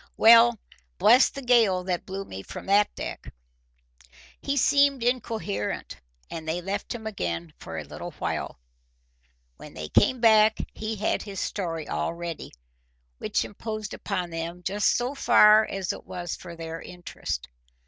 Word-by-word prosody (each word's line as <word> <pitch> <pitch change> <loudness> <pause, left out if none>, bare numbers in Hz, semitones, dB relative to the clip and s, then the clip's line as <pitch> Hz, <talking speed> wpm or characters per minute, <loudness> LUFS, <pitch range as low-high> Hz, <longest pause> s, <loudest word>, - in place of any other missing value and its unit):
Well, 230 +1 +7 0.4
bless 225 +7 +6
the 275 - -8
gale 225 -7 +4
that 180 -1 -3
blew 195 +1 -5
me 95 - -8
from - - -9
that 205 +1 +3
deck!" - - -6 1.1
He 280 0 -1
seemed 280 -1 +3
incoherent, 225 - -2 0.3
and 160 -1 -6
they 165 +2 -1
left 195 +5 -4
him 220 -2 -8
again 85 - -4
for - - -7
a - - -4
little - - -8
while. - - -4 1.0
When - - -12
they 75 0 -6
came 255 - +3
back 220 -1 +5 0.2
he 220 +1 -4
had 210 +1 0
his 200 -3 -7
story 165 -5 -3
all 75 - -2
ready, 170 -1 -6 0.7
which - - -1
imposed 215 0 -6
upon 185 -4 -3
them 165 +2 -5
just 200 +2 +1
so 245 +3 -2
far 215 -5 +6
as 195 -2 -3
it - - -10
was 175 -2 -5
for 170 - -10
their 165 0 -6
interest. 175 - -6
200 Hz, 150 wpm, -26 LUFS, 170-225 Hz, 1.1 s, Well